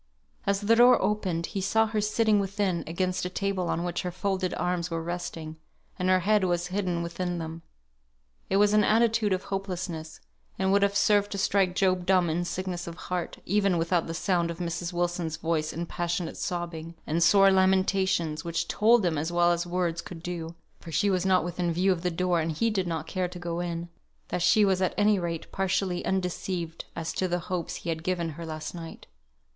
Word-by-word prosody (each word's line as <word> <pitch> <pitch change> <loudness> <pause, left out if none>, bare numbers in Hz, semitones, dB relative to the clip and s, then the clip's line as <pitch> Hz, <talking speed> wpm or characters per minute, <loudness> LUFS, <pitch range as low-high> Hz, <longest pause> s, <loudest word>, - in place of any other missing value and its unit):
As 200 0 +1
the 220 +3 +4
door 245 +2 +7
opened 185 -6 0
he 195 - -4
saw 220 +3 +3
her 215 -1 -1
sitting 215 0 +2
within, 195 -3 -1
against 185 +2 -1
a 180 - -2
table 190 -1 -2
on 170 - -1
which 175 -1 -2
her 180 - -3
folded 185 0 -1
arms 180 -1 -1
were 165 -1 -2
resting, 165 -2 -5 0.4
and 180 0 +1
her 185 0 +4
head 210 +2 +3
was 175 -1 +1
hidden 180 -4 -1
within 175 +1 -3
them. 165 0 -6 0.9
It 195 - +2
was 205 0 +4
an 210 0 +5
attitude 225 -1 +3
of 185 0 0
hopelessness, 180 -5 -4 0.4
and 190 0 +1
would 200 +1 +4
have 200 0 +2
served 205 0 +3
to - - -3
strike 190 -2 +2
Job 185 -2 +1
dumb 180 -3 +3
in 175 +2 -1
sickness 180 -1 -4
of 170 - -6
heart, 180 0 -4
even 195 -1 +2
without 170 +1 +1
the 165 - -4
sound 175 -2 +1
of 170 - -5
Mrs. 170 0 -3
Wilson's 175 -2 -1
voice 160 -2 -1
in 170 +1 -4
passionate 175 0 -3
sobbing, 170 -2 -4
and 165 +2 0
sore 195 +2 +6
lamentations, 190 -4 +2
which 170 -1 -2
told 225 -1 +4
him 160 -4 +1
as 160 +3 -2
well 175 0 +4
as 175 0 -1
words 175 -2 -1
could 170 -2 -10
do 170 -2 -5 0.2
(for 165 - -10
she 200 +5 +2
was 185 0 +1
not 185 -2 +4
within 175 0 -2
view 180 +4 +2
of 175 -3 -1
the 180 - 0
door, 180 0 +1
and 160 0 -1
he 230 +9 +1
did 190 -4 -1
not 160 -2 -3
care 185 +2 -2
to 180 - -9
go 175 -1 -4
in), 170 -1 -3 0.4
that 180 - -2
she 210 +4 +5
was 190 -1 +2
at 185 - 0
any 205 -1 +4
rate 170 -2 -4
partially 185 -1 0
undeceived 180 -2 -2
as 165 -1 -3
to 185 - 0
the 175 0 0
hopes 175 -3 -2
he 170 - -6
had 160 -1 -2
given 175 -2 -1
her 165 +2 -7
last 155 -1 -5
night. 165 -2 -9
180 Hz, 205 wpm, -27 LUFS, 170-195 Hz, 0.9 s, door